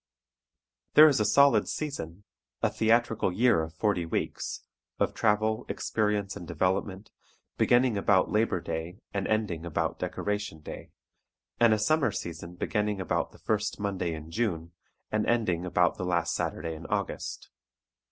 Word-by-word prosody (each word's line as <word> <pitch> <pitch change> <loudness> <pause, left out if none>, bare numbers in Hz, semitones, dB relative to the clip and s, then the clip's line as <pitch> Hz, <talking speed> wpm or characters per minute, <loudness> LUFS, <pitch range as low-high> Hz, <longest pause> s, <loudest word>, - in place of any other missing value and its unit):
There 155 +1 +10
is 140 -6 +3
a 105 - +2
solid 140 +7 +5
season, 100 - -5 0.4
a - - +3
theatrical 115 -2 +2
year 110 -2 +3
of 80 0 -6
forty 100 -1 +1
weeks, 80 - -3 0.4
of - - 0
travel, 110 +1 +1
experience 105 -2 -1
and 85 - -8
development, 95 +4 -1 0.4
beginning 120 -3 +3
about 95 -2 +3
Labor 105 -4 +2
Day 85 +4 -5 0.2
and 100 -1 -1
ending 105 -7 -1
about 85 -3 -2
Decoration 105 -6 -3
Day, - - -9 0.7
and 115 -1 +6
a 110 - +4
summer 140 +3 +2
season 85 -2 -6
beginning 105 +2 -1
about 95 - -1
the - - -17
first 105 -1 -1
Monday 95 -5 -2
in 80 +1 -9
June 85 -6 -2 0.4
and 110 0 0
ending 90 -7 +1
about 90 0 +2
the - - -2
last 85 -2 0
Saturday 80 -1 -3
in 80 - -9
August. - - -3
100 Hz, 145 wpm, -28 LUFS, 85-110 Hz, 0.7 s, There